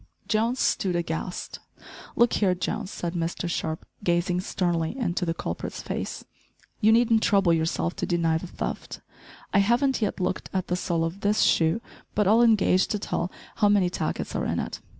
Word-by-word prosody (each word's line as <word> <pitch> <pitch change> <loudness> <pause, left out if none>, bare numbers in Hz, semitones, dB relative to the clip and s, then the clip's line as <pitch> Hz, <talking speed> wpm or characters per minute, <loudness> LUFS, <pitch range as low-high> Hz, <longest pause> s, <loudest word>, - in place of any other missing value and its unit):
Jones 230 +3 +1
stood 185 -3 +1
aghast. 170 +1 -3 0.6
"Look 235 0 +4
here, 185 -3 +2
Jones," 205 +2 -3
said 175 -3 -4
Mr 170 +1 -2
Sharp, 160 -2 -3 0.2
gazing 175 0 +1
sternly 175 +2 -1
into 180 -7 -1
the 165 - +1
culprit's 85 - -5
face, - - -4 0.5
"you 215 - +5
needn't 230 -1 +4
trouble 195 -5 +4
yourself 165 +1 0
to - - -2
deny 165 -2 +1
the 180 - -7
theft. - - -5 0.5
I 200 - +5
haven't 240 +6 +2
yet 210 -1 -1
looked 185 0 -2
at 185 -2 -2
the 180 - +1
sole 170 -2 -1
of 165 +4 -3
this 210 +1 +2
shoe, 165 +7 +3 0.3
but 210 -2 +2
I'll 220 +4 +5
engage 210 -5 +4
to 210 - -1
tell 180 -3 -2 0.3
how 210 -2 +4
many 195 -3 +3
tackets - - -3
are - - 0
in - - -1
it. - - -4
185 Hz, 175 wpm, -26 LUFS, 170-215 Hz, 0.6 s, you